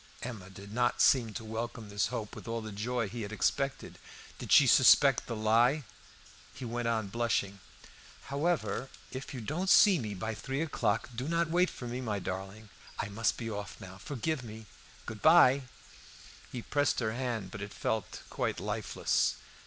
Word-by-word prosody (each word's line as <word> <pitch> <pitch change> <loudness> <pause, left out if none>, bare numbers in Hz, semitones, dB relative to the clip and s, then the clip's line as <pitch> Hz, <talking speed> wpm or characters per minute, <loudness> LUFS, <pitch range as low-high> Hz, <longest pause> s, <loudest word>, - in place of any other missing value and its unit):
Emma 110 -7 -7
did 100 +2 -11
not 120 +1 +1
seem 120 -5 +4
to 115 +2 -6
welcome 110 0 -5
this 100 0 0
hope 115 -4 -5
with - - -10
all 115 0 -2
the 110 -1 -7
joy 115 +3 -2
he 115 +4 -6
had 100 -1 -5
expected. 135 +6 -1 0.4
Did - - -7
she - - +8
suspect - - +6
the 115 - -3
lie? 115 +7 +3 0.7
He 130 - -7
went 120 0 -2
on, 110 -3 0
blushing 100 -3 -1 0.6
"However, 140 -2 -1 0.2
if 130 0 -6
you 130 - -6
don't 170 - -2
see 195 -4 +7
me 105 -4 -4
by 110 +4 -3
three 135 +6 -3
o'clock 115 -9 -1
do 125 +4 -4
not 165 0 0
wait 180 +2 +3
for 125 - -8
me, 125 +2 -4
my 110 -5 -2
darling. 95 +3 -6 0.3
I 100 - -3
must 110 +2 0
be 115 - -5
off 105 -2 -6
now; 95 +1 -10
forgive 145 +4 -3
me! 110 -1 -9 0.4
Goodbye!" 130 +1 +5 0.9
He 120 - -5
pressed 145 -2 +1
her 110 -3 0
hand, 120 -6 -3
but 105 - -7
it 105 0 -6
felt 110 -5 -3
quite - - -2
lifeless. - - 0
115 Hz, 175 wpm, -31 LUFS, 105-130 Hz, 0.9 s, she